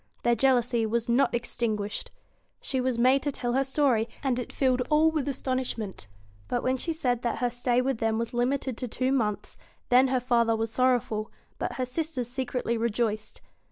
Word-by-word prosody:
Their 240 - +4
jealousy 245 -1 +2
was 230 +1 -1
not 240 +3 +3
extinguished. 220 -3 -2 0.5
She 260 -2 -2
was 255 -2 0
made 255 +3 +4
to 290 - -1
tell 245 -3 -2
her 270 +2 +3
story, 265 -5 +2 0.2
and 255 -3 +1
it 245 - -5
filled 255 -2 +1
all 310 +1 +4
with 305 -3 -2
astonishment. 255 - -3 0.4
But 245 - -1
when 260 +1 +1
she 330 - -2
said 250 -7 0
that 240 - -1
her 245 -1 0
stay 245 0 +1
with 265 -3 -1
them 225 -1 +1
was 230 +1 -3
limited 255 0 0
to 250 - -3
two 255 +3 -1
months, 215 -6 -1 0.3
then 255 +2 +6
/her 260 -1 +1
father 235 -2 +3
was 225 0 -2
sorrowful, 240 -4 +1 0.3
but - - -2
her 255 - -2
sisters 255 -2 -3
secretly 250 -2 -2
v - - -4
rejoiced. 215 -2 -1
245 Hz, 190 wpm, -27 LUFS, 230-260 Hz, 0.5 s, then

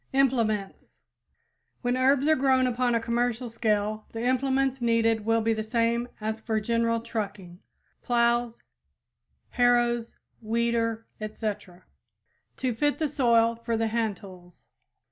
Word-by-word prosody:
IMPLEMENTS 230 -7 0 0.8
When 245 0 +1
herbs 270 +2 +3
are 315 - +5
grown 260 -1 +3
upon 245 -1 +1
a - - +2
commercial 235 +1 -1
scale 215 -1 -1
the 225 0 -4
implements 265 +1 +1
needed 230 -2 +2
will 225 0 +2
be 225 +1 +1
the 220 - -2
same 230 +2 0
as 220 +1 -3
for 220 0 -1
general 230 +1 0
trucking 200 -6 -5 0.4
plows, 235 -1 +1 0.9
harrows, 240 -1 +1 0.2
weeder, 230 0 -1
etc. 210 -4 -5 0.7
to 255 -2 -1
fit 290 +5 0
the 315 - 0
soil 235 -5 +3
for 230 0 -3
the 225 0 0
hand 220 -3 -1
tools. 180 -3 -14
230 Hz, 125 wpm, -27 LUFS, 220-245 Hz, 0.9 s, are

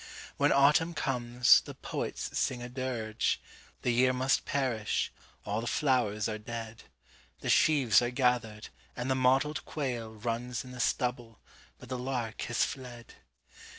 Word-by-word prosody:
When - - +3
autumn 150 +5 +4
comes, 125 -3 +4
the - - -10
poets - - -4
sing 125 -2 -1
a 120 - -6
dirge:The 120 -1 -3
year 130 +2 +3
must 130 +1 +1
perish; 125 -6 -1 0.3
all 105 +2 -1
the 120 - -5
flowers 120 -8 +1
are 110 -1 -4
dead; 115 0 -7 0.6
The - - 0
sheaves 135 -9 +5
are 120 - 0
gathered; 125 -4 0 0.3
and 125 +2 -2
the - - +3
mottled 135 +4 +2
quailRuns 120 -3 -3
in 125 - -10
the 125 - -9
stubble, 120 -3 -1 0.4
but - - -13
the 130 - -3
lark 125 -3 -3
has 120 - +2
fled! 120 -3 -8
125 Hz, 140 wpm, -30 LUFS, 115-130 Hz, 0.6 s, sheaves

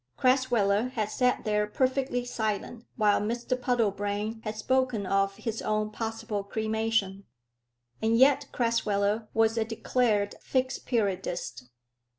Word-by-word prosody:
Crasweller 245 -4 +2
had 215 -4 -2
sat 250 -1 +1
there 210 -1 +1
perfectly 260 +1 0
silent 220 0 -3
while 210 -2 +3
Mr 240 +4 -1
Puddlebrane 215 -3 -1
had 215 0 -4
spoken 250 -2 0
of 195 +1 +1
his 225 +1 -4
own 215 0 -1
possible 225 -1 -3
cremation. 220 -2 -1 0.8
And 225 +1 +2
yet 265 +2 +5
Crasweller 215 -2 0
was 225 0 +3
a - - +2
declared 220 -2 0
Fixed 260 0 -1
Periodist. 180 - -2
220 Hz, 120 wpm, -28 LUFS, 205-245 Hz, 0.8 s, yet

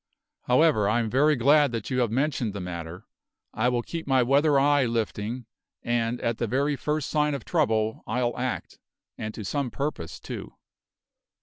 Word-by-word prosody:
However, 125 -6 +4
I 110 +3 +2
am 115 -2 -2
very 150 +4 +4
glad 145 +2 +4
that 115 +2 -4
you 130 - +1
have 120 -3 +2
mentioned 130 -3 0
the 100 - -5
matter; 85 -1 -6 0.5
I 115 +3 +1
will 120 -1 0
keep 165 +3 -6
my 130 -2 +4
weather 140 +3 +4
eye 145 -1 +4
lifting, 115 +1 -2 0.4
and 120 0 0
at 115 0 -1
the 120 - 0
very 140 +5 +1
first 150 0 -2
sign 150 0 +1
of 135 - -7
trouble 110 -9 0
I'll 120 +1 0
act, 125 0 -4 0.4
and 110 - -5
to 110 - -6
some 140 +5 -1
purpose, 135 - -4
too." - - -8
125 Hz, 175 wpm, -26 LUFS, 110-145 Hz, 0.5 s, However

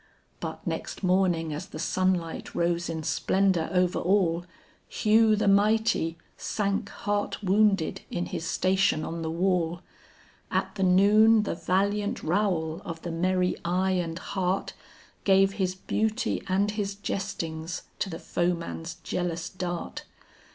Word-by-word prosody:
But - - -6
next - - -4
morning 180 -4 +2
as 150 - -5
the - - -9
sunlight 175 0 -1
rose 170 0 0
in 160 -1 -3
splendor 190 -1 +1
over 180 -1 +2
all, 175 -2 +2 0.4
Hugh 220 0 +4
the 210 - 0
mighty, 205 -4 +3 0.2
sank 200 0 -1
heart 205 +1 -2
wounded 195 -3 +2
in 175 - -2
his - - -4
station 185 -4 +2
on 165 0 -4
the 160 - -2
wall, 175 0 0 0.7
At - - -1
the 200 - -5
noon 210 +4 +6
the - - -2
valiant 205 +5 0
Raoul 165 -3 0
of 165 -1 -7
the 170 - -3
merry 180 +2 +1
eye 185 +2 +1
and 170 -3 -1
heart, 190 0 -2 0.5
Gave 195 0 +5
his 185 -3 -1
beauty 220 +5 -1
and 195 +2 +2
his 205 -1 -3
jestings 170 -4 -4 0.2
to 195 - -1
the 165 - -5
foeman's 170 -1 -2
jealous 170 -2 -2
dart. 175 -2 -5
185 Hz, 135 wpm, -27 LUFS, 170-200 Hz, 0.7 s, noon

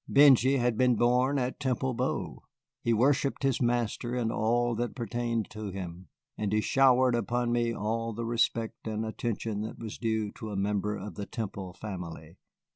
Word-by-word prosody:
Benjy 135 -1 +6
had 120 -3 +1
been 125 -1 +4
born 125 +4 +3
at 125 -1 -2
Temple 130 -1 0
Bow; - - -2 0.4
he 115 - +1
worshipped 135 +5 +2
his 135 -2 +1
master 120 0 0
and 115 -2 0
all 120 +2 +1
that 120 +1 -2
pertained 120 -2 -2
to 105 -1 -5
him, 90 -2 -7 0.3
and 105 -2 -1
he 110 - +3
showered 130 +1 +4
upon 120 0 0
me 120 -1 +1
all 115 +1 -2
the 115 +1 -4
respect 115 -1 -1
and 110 0 -2
attention 110 -1 -3
that 110 - -5
was 110 -2 -7
due 110 -3 -1
to 110 - -8
a 105 - -4
member 105 +1 0
of 105 +2 -7
the 100 -1 -6
Temple 100 -5 -5
family. 90 -5 -8
115 Hz, 175 wpm, -29 LUFS, 105-125 Hz, 0.4 s, Benjy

